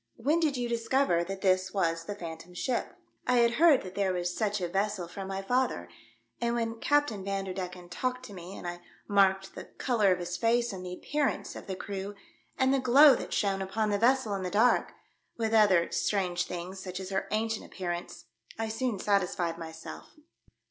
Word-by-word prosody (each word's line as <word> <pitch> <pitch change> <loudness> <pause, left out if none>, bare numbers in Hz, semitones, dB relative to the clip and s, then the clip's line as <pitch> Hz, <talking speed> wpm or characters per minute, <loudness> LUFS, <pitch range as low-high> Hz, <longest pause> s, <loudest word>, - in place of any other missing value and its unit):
When 295 +8 +1
did 300 -5 +1
you 245 -1 -1
discover 235 -5 +1
that 195 +1 -6
this 185 0 +2
was 165 -3 0
the 205 - -4
Phantom 170 -1 -8
Ship 250 +5 -2
?" - - -44
I 250 - +4
had 235 -1 +5
heard 320 -6 +6
that 185 -1 -8
there 195 -1 +1
was 175 0 -2
such 210 -2 0
a 180 - -1
vessel 195 0 -1
from 190 +2 -7
my 195 0 -4
father, 240 - 0 0.5
and 235 0 +1
when 230 -1 -2
Captain 290 -9 +1
Van 195 0 -2
derdecken 180 -1 -5
talked 250 +7 -3
to 205 - -10
me 180 +1 -9
and - - -7
I 175 0 -5 0.3
marked 195 -1 +3
the - - -8
colour 220 -7 +1
of 180 - +3
his 175 0 -4
face 235 0 +2
and 185 -1 -6
the 180 - -6
appearance 290 +7 -2
of - - -9
the 190 - -3
crew, 200 +1 -5 0.4
and 260 +1 +3
the 275 - +3
glow 265 +3 +8
that - - -4
shone 195 -2 +1
upon 210 +3 -1
the 205 - +1
vessel 245 -1 +3
in 195 - -2
the 185 - -2
dark, 220 +6 +3 0.5
with 225 -1 -1
other 200 -6 +5
strange 180 -4 0
things, 180 +2 -6
such 185 0 -6
as 190 0 -6
her 190 - -1
ancient 220 +1 -1
appearance, 175 -2 -5 0.3
I 225 0 -2
soon 225 0 -1
satis 195 -1 +1
fied 170 -1 -2
myself." 160 0 -9
195 Hz, 205 wpm, -29 LUFS, 180-235 Hz, 0.5 s, glow